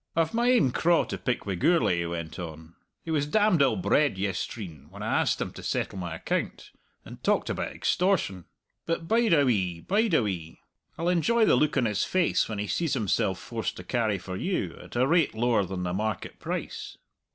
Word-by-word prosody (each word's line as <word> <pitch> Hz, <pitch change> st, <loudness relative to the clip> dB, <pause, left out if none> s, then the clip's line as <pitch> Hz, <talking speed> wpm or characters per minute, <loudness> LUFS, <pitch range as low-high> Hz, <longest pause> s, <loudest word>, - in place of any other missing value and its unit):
"I've 165 Hz, +2 st, +1 dB
my 235 Hz, +1 st, +2 dB
ain 235 Hz, -, +4 dB
craw 170 Hz, +6 st, +3 dB
to -, -, -5 dB
pick 125 Hz, -2 st, -2 dB
wi' 100 Hz, -, -2 dB
Gourlay," 95 Hz, -, +2 dB
he 85 Hz, -, -1 dB
went 85 Hz, 0 st, -5 dB
on. 80 Hz, -1 st, -8 dB, 0.3 s
"He 165 Hz, -, -3 dB
was 145 Hz, -2 st, +1 dB
damned 205 Hz, -2 st, +3 dB
ill 135 Hz, -, +4 dB
bred 150 Hz, -, +2 dB
yestreen 95 Hz, -, -4 dB
when -, -, -9 dB
I -, -, +1 dB
asked -, -, 0 dB
him -, -, -3 dB
to -, -, -9 dB
settle 95 Hz, -, -2 dB
my 90 Hz, -2 st, -4 dB
account, -, -, -3 dB, 0.3 s
and -, -, -11 dB
talked -, -, +1 dB
about -, -, -3 dB
extortion. 175 Hz, -, 0 dB, 0.4 s
But 165 Hz, 0 st, -2 dB
bide 230 Hz, +1 st, +3 dB
a 145 Hz, -3 st, +5 dB
wee, 95 Hz, -9 st, 0 dB
bide 210 Hz, -, +2 dB
a 125 Hz, -, +4 dB
wee! 85 Hz, -6 st, -4 dB, 0.4 s
I'll 165 Hz, -, -2 dB
enjoy 180 Hz, +7 st, +3 dB
the -, -, +5 dB
look 150 Hz, -2 st, +2 dB
on 130 Hz, -, +3 dB
his 105 Hz, -2 st, 0 dB
face 185 Hz, -3 st, +1 dB
when 110 Hz, -, -3 dB
he 105 Hz, -, -2 dB
sees 160 Hz, -, 0 dB
himself 100 Hz, -5 st, 0 dB
forced 115 Hz, -1 st, -4 dB
to 90 Hz, -, -8 dB
carry 110 Hz, 0 st, 0 dB
for 95 Hz, 0 st, -7 dB
you, 185 Hz, -, -2 dB
at -, -, -12 dB
a 125 Hz, +2 st, +3 dB
rate 160 Hz, -3 st, +2 dB
lower 115 Hz, -3 st, +2 dB
than 90 Hz, 0 st, -4 dB
the 90 Hz, 0 st, -2 dB
market 105 Hz, 0 st, -3 dB
price." -, -, -5 dB
120 Hz, 210 wpm, -27 LUFS, -, 0.4 s, a